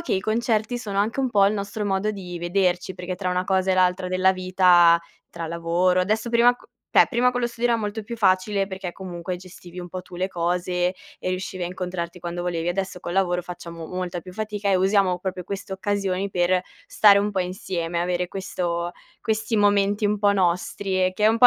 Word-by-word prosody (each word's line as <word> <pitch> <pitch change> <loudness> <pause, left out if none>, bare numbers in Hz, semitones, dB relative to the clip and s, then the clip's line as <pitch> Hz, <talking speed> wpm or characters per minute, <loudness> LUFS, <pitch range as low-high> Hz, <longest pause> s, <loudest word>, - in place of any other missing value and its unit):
che 340 - -3
i 190 - +2
concerti 220 +2 0
sono 205 -4 -4
anche 220 +6 +1
un 260 -2 0
po' 200 -3 +5
il 200 - +2
nostro 205 +1 -3
modo 195 +1 0
di 180 -4 -7
vederci. 180 +1 0
Perché 180 0 -5
tra 185 -1 -2
una 180 0 0
cosa 190 0 +1
e - - +3
l'altra 185 0 +2
della 185 +1 +3
vita, 180 -2 +5 0.3
tra 165 -1 -5
lavoro, 170 +2 +1
adesso, 215 +5 0
prima 240 +1 +5
co - - -20 0.2
cioè - - +6
prima 250 0 +3
con 245 0 -2
lo - - +3
studio 235 0 -1
era 230 - +2
molto 210 +1 -3
più 235 +3 -6
facile 195 -1 +2
perché, 190 -2 -5
comunque, 180 -1 -5
gestivi 180 0 -12
un 175 - -6
po' 185 +1 -5
tu 180 -1 -12
le 185 +1 0
cose 180 +1 0 0.2
e - - -4
riuscivi 185 0 -3
a - - 0
incontrarti 180 -1 -5
quando 175 0 -4
volevi. 170 -2 -2
Adesso 190 0 -2
col 175 - -5
lavoro, 180 -1 +1
facciamo 170 -2 -8
molta 180 0 -4
più 185 +1 -11
fatica, 210 0 -3
e - - +4
usiamo 190 -1 +2
proprio 185 0 -4
queste 195 +1 -6
occasioni 195 -1 -1
per 180 0 +2 0.3
stare 205 -2 +6
un 205 +1 0
po' 195 -2 -1
insieme, 180 -2 -3
avere 180 0 0
questo 175 -3 -3 0.3
questi 220 0 -1
momenti 205 0 +3
un 210 0 0
po' 205 0 +4
nostri 185 +1 0
e 185 - +1
che 210 +3 -1
è - - +7
un 225 +1 +2
po' 245 - +9
185 Hz, 215 wpm, -24 LUFS, 180-205 Hz, 0.3 s, po